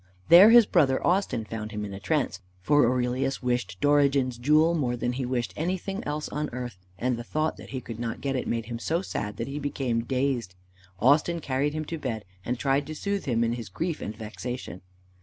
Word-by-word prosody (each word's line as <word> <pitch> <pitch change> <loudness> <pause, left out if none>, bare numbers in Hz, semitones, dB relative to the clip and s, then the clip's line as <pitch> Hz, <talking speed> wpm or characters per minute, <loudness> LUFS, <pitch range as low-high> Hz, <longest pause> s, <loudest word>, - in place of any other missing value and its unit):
There 185 +5 +10
his 235 -1 +8
brother 140 -9 +2
Austin 180 - +1
found 110 0 -5
him 105 -1 -4
in 100 - -7
a 95 - -6
trance, 125 -3 -1 0.2
for 145 +7 +4
Aurelius 125 +2 -1
wished 125 0 -1
Dorigen's 140 -4 +3
jewel 155 +6 +4
more 130 -7 0
than 120 +1 -2
he 130 0 -3
wished 125 -2 -2
anything 185 +4 -3
else 150 +1 -3
on 150 0 -3
earth, 120 -6 -6 0.2
and 125 +1 0
the 120 - -5
thought 155 +5 -1
that - - -11
he 130 -2 -4
could 115 -2 -8
not 115 -1 -3
get 135 -1 -2
it 130 - -2
made 115 -1 -1
him 115 0 -5
so 165 +8 -1
sad 105 - -4
that 115 - -3
he 140 +2 -4
became 130 -5 -1
dazed. 125 -6 -1 0.4
Austin 150 +7 +3
carried 140 0 -1
him 155 0 -3
to 165 +1 -5
bed, 115 -7 -4 0.2
and 125 +1 -2
tried 135 +3 +1
to 155 - -6
soothe 200 +3 -2
him 115 -3 +1
in 115 0 +1
his 120 -4 -6
grief 165 - -3
and 105 - -5
vexation. 110 -3 -6
130 Hz, 215 wpm, -27 LUFS, 115-150 Hz, 0.4 s, There